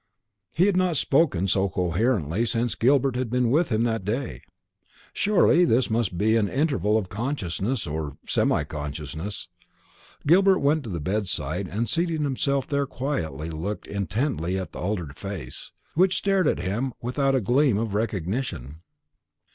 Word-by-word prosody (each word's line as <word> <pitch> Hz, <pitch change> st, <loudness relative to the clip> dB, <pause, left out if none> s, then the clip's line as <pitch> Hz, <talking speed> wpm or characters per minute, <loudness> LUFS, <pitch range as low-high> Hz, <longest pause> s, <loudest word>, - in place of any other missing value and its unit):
He 180 Hz, -, +5 dB
had 200 Hz, -2 st, +2 dB
not 180 Hz, -4 st, +2 dB
spoken 135 Hz, -, +2 dB
so 95 Hz, +1 st, +2 dB
coherently 90 Hz, -, 0 dB
since 120 Hz, +1 st, 0 dB
Gilbert 135 Hz, +1 st, +2 dB
had 125 Hz, -2 st, -1 dB
been 125 Hz, 0 st, +1 dB
with 160 Hz, +5 st, +3 dB
him 110 Hz, -1 st, +1 dB
that 115 Hz, -4 st, 0 dB
day. 105 Hz, -, -3 dB, 0.7 s
Surely 200 Hz, -3 st, +4 dB
this 125 Hz, -7 st, +2 dB
must 110 Hz, -6 st, 0 dB
be 110 Hz, +3 st, +3 dB
an 105 Hz, -3 st, +1 dB
interval 135 Hz, -7 st, +1 dB
of 105 Hz, -4 st, -2 dB
consciousness, 110 Hz, -, -2 dB
or 75 Hz, -2 st, -4 dB
semi -, -, +2 dB
consciousness. 75 Hz, +6 st, -6 dB, 0.8 s
Gilbert 190 Hz, +5 st, +5 dB
went 145 Hz, 0 st, +1 dB
to -, -, -6 dB
the 85 Hz, -4 st, -3 dB
bedside, 95 Hz, +4 st, -2 dB
and, 110 Hz, +5 st, -2 dB
seating 165 Hz, -2 st, 0 dB
himself 140 Hz, -1 st, 0 dB
there 140 Hz, -2 st, -1 dB
quietly, 80 Hz, -, -3 dB
looked 90 Hz, +7 st, -4 dB
intently 100 Hz, -, -2 dB
at 95 Hz, -, -5 dB
the -, -, -8 dB
altered 90 Hz, -7 st, -3 dB
face, 95 Hz, -11 st, -7 dB, 0.2 s
which 185 Hz, +3 st, +3 dB
stared 195 Hz, -4 st, +2 dB
at -, -, +1 dB
him 110 Hz, +8 st, -2 dB
without 135 Hz, +3 st, +1 dB
a -, -, +3 dB
gleam 125 Hz, +1 st, +2 dB
of 110 Hz, -2 st, -2 dB
recognition. 95 Hz, -, -3 dB
115 Hz, 155 wpm, -25 LUFS, 95-140 Hz, 0.8 s, He